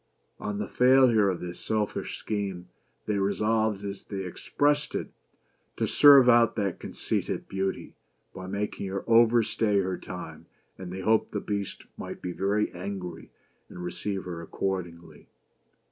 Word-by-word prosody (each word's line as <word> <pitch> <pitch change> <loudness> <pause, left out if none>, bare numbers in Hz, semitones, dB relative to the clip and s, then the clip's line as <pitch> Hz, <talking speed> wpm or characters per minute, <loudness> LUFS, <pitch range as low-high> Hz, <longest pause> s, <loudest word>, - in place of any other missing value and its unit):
On 105 -1 -3
the 105 -1 -3
failure 125 -5 +5
of 90 - -3
this 90 0 -6
selfish 105 -2 -2
scheme, 100 -4 -4 0.4
they 105 -2 0
resolved, 105 +1 +1
as 100 0 -5
they 95 -2 -5
expressed 145 +10 0
it, - - -3 0.3
" - - -43
to - - +1
serve 140 -3 +7
out 120 -2 +5
that 100 -5 -2
conceited - - -3
Beauty," 95 0 -3 0.4
by 95 0 -8
making 100 0 -3
her 95 0 -4
overstay 115 -2 +4
her 95 -1 -2
time; - - -8 0.3
and 90 -2 -8
they 95 +1 -5
hoped 110 +3 +2
the 105 - -1
Beast 100 -1 -4
might - - -7
be 90 - -4
very 100 +4 0
angry 90 -2 -6 0.4
and 90 - -8
receive 95 +3 -3
her 85 -2 -6
accordingly. 85 -1 -5
100 Hz, 145 wpm, -27 LUFS, 95-110 Hz, 0.4 s, serve